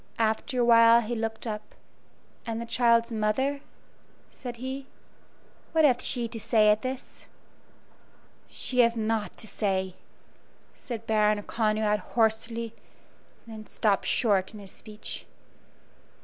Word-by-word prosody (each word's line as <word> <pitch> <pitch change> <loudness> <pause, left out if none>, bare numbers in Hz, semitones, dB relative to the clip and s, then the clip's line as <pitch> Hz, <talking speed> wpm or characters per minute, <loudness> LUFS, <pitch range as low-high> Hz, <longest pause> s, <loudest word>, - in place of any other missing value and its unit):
After 225 +3 0
a - - +3
while 230 0 +7
he 235 +1 -4
looked 225 0 -3
up. 210 -1 -6 0.7
"And 225 0 -2
the 235 - -4
child's 235 0 +3
mother," 235 +6 0 0.7
said 245 -2 -7
he 265 +2 -5 0.9
"what 320 -1 +5
hath 255 -3 +3
she 240 -2 0
to 225 0 -6
say 215 -1 +4
at 210 +1 +3
this?" 260 0 -6 1.2
"She 250 - -3
hath 235 -1 +5
naught 220 -1 -1
to - - -9
say," 190 -3 -1 0.8
said 230 -3 -7
Baron 210 -1 +2
Conrad, 215 -1 +1
hoarsely, 230 0 -1 0.7
and 225 -1 -9
then 215 - -12
stopped 205 -3 0
short 200 -3 +1
in - - -9
his 195 -2 -11
speech. 215 -1 -9
225 Hz, 130 wpm, -27 LUFS, 215-235 Hz, 1.2 s, while